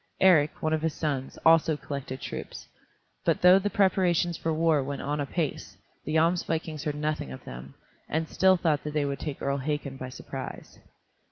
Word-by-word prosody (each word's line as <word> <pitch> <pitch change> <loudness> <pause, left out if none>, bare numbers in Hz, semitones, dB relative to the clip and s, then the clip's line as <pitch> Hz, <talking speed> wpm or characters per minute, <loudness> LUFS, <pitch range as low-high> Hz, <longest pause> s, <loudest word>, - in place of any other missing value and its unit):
Eric 160 -6 +4
one 155 0 +1
of 160 - 0
his 160 -1 -1
sons, 140 -4 -3
also 160 -1 +5
collected 140 -3 -6
troops, - - -7 0.6
but - - +1
though 180 +2 +8
the 205 +1 -1
preparations 180 -4 +2
for 165 - -2
war 160 -2 +2
went 140 +1 -5
on 145 +1 -2
apace, 145 +2 -3 0.3
the 155 - -2
Jomsvikings 160 -2 0
heard 150 -1 -1
nothing 150 - -2
of 65 - -10
them, 65 +2 -9 0.3
and 160 +1 -1
still 190 +2 +4
thought 155 -4 +1
that 150 0 -5
they 150 -1 +2
would 140 -1 -3
take 150 -3 -5
Earl 140 0 0
Hakon 140 -1 -3
by 130 -1 -6
surprise. - - -8
155 Hz, 180 wpm, -27 LUFS, 140-165 Hz, 0.6 s, though